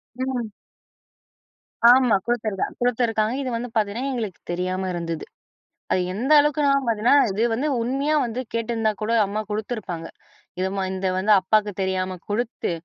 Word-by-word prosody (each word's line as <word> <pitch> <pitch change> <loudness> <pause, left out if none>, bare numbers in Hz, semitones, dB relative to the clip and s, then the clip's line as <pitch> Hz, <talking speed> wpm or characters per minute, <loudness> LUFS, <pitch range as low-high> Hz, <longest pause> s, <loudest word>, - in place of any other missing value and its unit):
ம். 250 -4 -3 1.4
ஆமா 250 -3 +6
குடுத்துருக்கா 220 -5 -1
குடுத்துருக்காங்க. 230 -2 +1
இது 260 - -3
வந்து 245 +1 -5
பார்த்தீங்கன்னா 220 +5 0
எங்களுக்கு 220 -7 -4
தெரியாம 185 +1 -2
இருந்தது. 165 -2 -4 0.7
அது 185 - +2
எந்த 250 +9 0
அளவுக்குனா 295 -1 +2 0.2
பார்த்தீங்கன்னா, 230 +2 +3 0.2
இது 205 +4 0
வந்து 265 +7 0
உண்மையா 275 +5 0
வந்து 240 +1 -3
கேட்டிருந்தா 225 -1 0
கூட 215 +2 -1
அம்மா 210 +2 -3
குடுத்துருப்பாங்க. 210 -6 -4 0.5
இது 185 +1 0 0.2
இந்த 190 0 -1
வந்து 195 +3 +3
அப்பாக்கு 210 +2 +2
தெரியாம 185 -1 -1
குடுத்து 225 -1 -2
220 Hz, 130 wpm, -23 LUFS, 190-245 Hz, 1.4 s, ஆமா